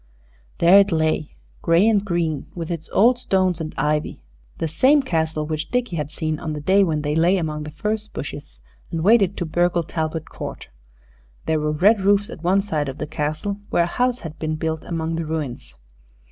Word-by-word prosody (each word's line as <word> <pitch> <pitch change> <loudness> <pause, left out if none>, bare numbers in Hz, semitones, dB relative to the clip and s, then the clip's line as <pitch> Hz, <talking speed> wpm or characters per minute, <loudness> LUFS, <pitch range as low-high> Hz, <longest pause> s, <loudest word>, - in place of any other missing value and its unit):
There 180 +4 +7
it 200 0 +3
lay, 155 -2 0 0.3
gray 170 +5 +4
and 210 -3 +3
green, 170 -7 -1
with 170 -1 -5
its 165 -1 -5
old 240 +4 +4
stones 185 -7 +1
and 155 - -5
ivy 150 0 -1 0.4
the 165 - -1
same 265 - +4
Castle 160 -7 -1
which 155 0 -4
Dickie 245 -6 -1
had 150 -3 -3
seen 155 0 -3
on 155 -2 -4
the 150 - -4
day 190 +7 +4
when 155 -5 0
they 145 0 -1
lay 170 +5 +3
among 155 -3 -3
the - - -6
furze 210 +8 -3
bushes 140 - -8 0.3
and 160 -1 -3
waited 200 -2 +4
to 175 - -2
burgle 175 +1 +1
Talbot 160 0 -3
Court. - - -8 0.8
There 160 -1 +1
were 150 0 0
red 195 +7 +4
roofs 200 +1 +2
at 165 - -10
one 190 +3 +3
side 155 -8 -2
of 135 - -7
the - - -3
Castle 155 +7 -3
where 170 - +3
a 170 - -5
house 250 0 +1
had 155 -2 -8
been 155 -1 -2
built 160 0 -3
among 165 -1 -2
the 165 - -3
ruins. 135 - -5
165 Hz, 200 wpm, -22 LUFS, 155-195 Hz, 0.8 s, There